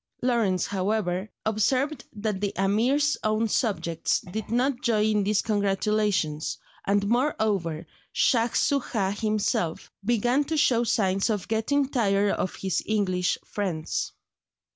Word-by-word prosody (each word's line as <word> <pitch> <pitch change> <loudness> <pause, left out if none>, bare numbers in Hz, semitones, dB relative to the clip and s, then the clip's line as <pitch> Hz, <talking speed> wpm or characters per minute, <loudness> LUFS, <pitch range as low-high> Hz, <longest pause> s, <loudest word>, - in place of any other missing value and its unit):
Lawrence, 225 -7 +2
however, 195 -1 -1 0.2
observed 255 +6 0
that 210 -2 -3
the 205 -1 0
Ameer's 245 +10 +2
own 215 +1 +1
subjects 170 -7 0
did 210 +4 -6
not 245 +2 +1
join 215 -2 +2
in 205 - +2
these 205 +1 +1
congratulations, 205 -6 0 0.3
and 200 0 +2
moreover 205 - 0 0.3
Shaj 235 -1 +2
Soojah 225 -8 +1
himself 210 -6 -1
began 240 +5 +2
to 315 +2 -2
show 240 -5 +3
signs 195 -2 +1
of 205 -3 -1
getting 225 +6 +1
tired 205 -6 +2
of 185 - -2
his 190 -2 -1
English 185 -4 +1
friends. 180 -6 -3
210 Hz, 120 wpm, -26 LUFS, 195-235 Hz, 0.3 s, show